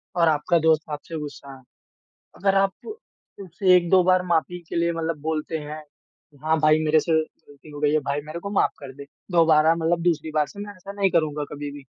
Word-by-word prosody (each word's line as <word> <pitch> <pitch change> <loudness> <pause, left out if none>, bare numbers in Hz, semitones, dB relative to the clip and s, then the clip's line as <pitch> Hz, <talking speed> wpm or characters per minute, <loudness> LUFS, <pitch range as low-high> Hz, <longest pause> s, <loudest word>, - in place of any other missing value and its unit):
और 170 -1 +3
आपका 160 +2 +2
दोस्त 160 0 +4
आपसे 155 +2 -6
गुस्सा 140 -2 -9
है। - - -18 0.7
अगर 195 0 +1
आप 195 - -1 0.5
उसे 185 0 +2
1-2 180 +1 +4
बार 185 0 +3
माफ़ी 175 +1 0
के - - -5
लिए 170 0 +1
मतलब 165 -2 -3
बोलते 160 +1 -2
हैं, 150 +1 -8 0.5
कि 145 - -22
हाँ 160 +1 +2
भाई 155 0 +4
मेरे 155 0 +4
से 165 - -3
गलती 155 -1 -4
हो 145 - -8
गई 150 0 +2
है, 155 - +3
भाई 140 0 -3
मेरे 160 +3 -6
को 200 - -6
माफ 200 - +2
कर 135 -2 -9
दे, 140 0 -10 0.3
दोबारा 160 -1 +5
मतलब 165 +1 0
दूसरी 160 -2 0
बार 150 -1 +3
से 200 - -12
मैं 205 0 -7
ऐसा 195 +2 -10
नहीं 200 -1 +1
करूँगा 150 -3 0
कभी 145 0 -6
भी। 145 -1 -11
160 Hz, 215 wpm, -23 LUFS, 150-175 Hz, 0.7 s, दोबारा